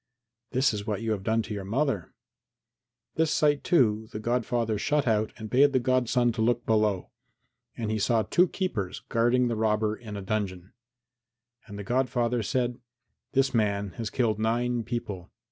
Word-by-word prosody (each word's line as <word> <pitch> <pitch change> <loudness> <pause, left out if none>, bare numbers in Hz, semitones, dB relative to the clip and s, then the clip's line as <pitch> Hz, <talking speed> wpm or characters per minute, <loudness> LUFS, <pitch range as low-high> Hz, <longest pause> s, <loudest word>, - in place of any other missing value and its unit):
"This 130 -1 +2
is 105 +1 -5
what 105 +1 -2
you 115 - -1
have 105 -3 -1
done 110 +3 +1
to 110 - -6
your 100 -2 -4
mother." 115 - -1 1.1
This 160 0 +3
sight, 145 -2 +2
too, 110 - +2
the 105 - -5
godfather 115 -1 0
shut 150 +5 +1
out 110 -2 +1
and 110 -1 -7
bade 135 +5 +4
the 130 - +4
godson 125 -1 +2
look 120 +1 0
below. 105 -4 +1 0.7
And 110 -2 -2
he 110 - -1
saw 110 +2 +2
two 180 +9 +3
keepers 105 - -3
guarding 120 +1 +3
the 115 - -1
robber 110 0 +1
in 110 -3 -8
a 100 - -6
dungeon. 95 -2 -3 0.9
And 100 -2 -8
the 100 - -5
godfather 120 0 0
said, 120 +3 -1 0.5
"This 135 0 +2
man 100 -3 0
has 115 -2 -3
killed 115 -4 0
nine 120 +2 0
people. 105 -6 -5
115 Hz, 165 wpm, -27 LUFS, 105-125 Hz, 1.1 s, bade